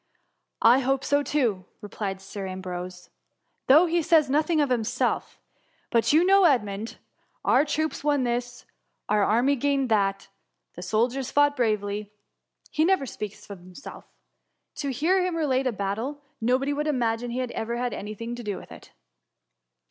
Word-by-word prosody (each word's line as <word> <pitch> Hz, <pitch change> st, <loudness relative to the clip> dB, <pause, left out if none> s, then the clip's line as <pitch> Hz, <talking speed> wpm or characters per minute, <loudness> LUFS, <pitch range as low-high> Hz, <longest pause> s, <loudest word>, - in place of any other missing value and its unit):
^ -, -, -49 dB, 0.4 s
*' -, -, -56 dB
I 245 Hz, +3 st, +7 dB
hope 270 Hz, 0 st, 0 dB
so 285 Hz, +1 st, +2 dB
too,'' 235 Hz, -11 st, 0 dB
replied 200 Hz, -2 st, -5 dB
Sir 195 Hz, 0 st, -7 dB
Ambrose; 180 Hz, -1 st, -7 dB, 0.6 s
though 305 Hz, +7 st, +7 dB
he 340 Hz, 0 st, +1 dB
says 315 Hz, -4 st, +3 dB
nothing 310 Hz, +3 st, +2 dB
of 285 Hz, -3 st, +1 dB
himself: 230 Hz, -3 st, -1 dB, 0.5 s
but 230 Hz, -2 st, +3 dB
you 320 Hz, +4 st, +5 dB
know 390 Hz, 0 st, +5 dB
Edmund: 220 Hz, -, 0 dB, 0.2 s
* -, -, -29 dB
Our 265 Hz, -, +5 dB
troops 315 Hz, 0 st, -2 dB
won 290 Hz, -2 st, +2 dB
this,' 245 Hz, 0 st, -3 dB, 0.2 s
* -, -, -51 dB
our 210 Hz, -1 st, +3 dB
army 245 Hz, +7 st, +3 dB
gained 275 Hz, -1 st, 0 dB
that 195 Hz, -3 st, +2 dB
!^ -, -, -15 dB
^ -, -, -23 dB, 0.4 s
the 180 Hz, -, -9 dB
soldiers 240 Hz, +7 st, 0 dB
fought 290 Hz, 0 st, +3 dB
bravely 210 Hz, -4 st, 0 dB
V -, -, -31 dB, 0.6 s
he 310 Hz, -, +1 dB
never 370 Hz, -4 st, +2 dB
speaks 210 Hz, -4 st, -7 dB
of 200 Hz, -2 st, -9 dB
himself. 180 Hz, +9 st, -11 dB, 0.7 s
To 285 Hz, -, -3 dB
46 265 Hz, -4 st, -3 dB
THS -, -, -9 dB
MUMUr. 355 Hz, +3 st, +4 dB
hear 375 Hz, -, +2 dB
him 365 Hz, -2 st, -1 dB
relate 270 Hz, -5 st, +1 dB
a -, -, +1 dB
battle, 225 Hz, +8 st, -4 dB, 0.2 s
nobody 260 Hz, +5 st, +1 dB
would 300 Hz, +1 st, -2 dB
imagine 240 Hz, -4 st, 0 dB
he 235 Hz, -, -4 dB
had 255 Hz, -2 st, -2 dB
ever 235 Hz, +2 st, -3 dB
had 245 Hz, 0 st, -2 dB
any 210 Hz, +1 st, -6 dB
thing 230 Hz, +3 st, -6 dB
to 240 Hz, 0 st, -7 dB
do 205 Hz, -3 st, -3 dB
with -, -, -12 dB
it.' -, -, -13 dB
245 Hz, 190 wpm, -26 LUFS, 210-285 Hz, 0.7 s, I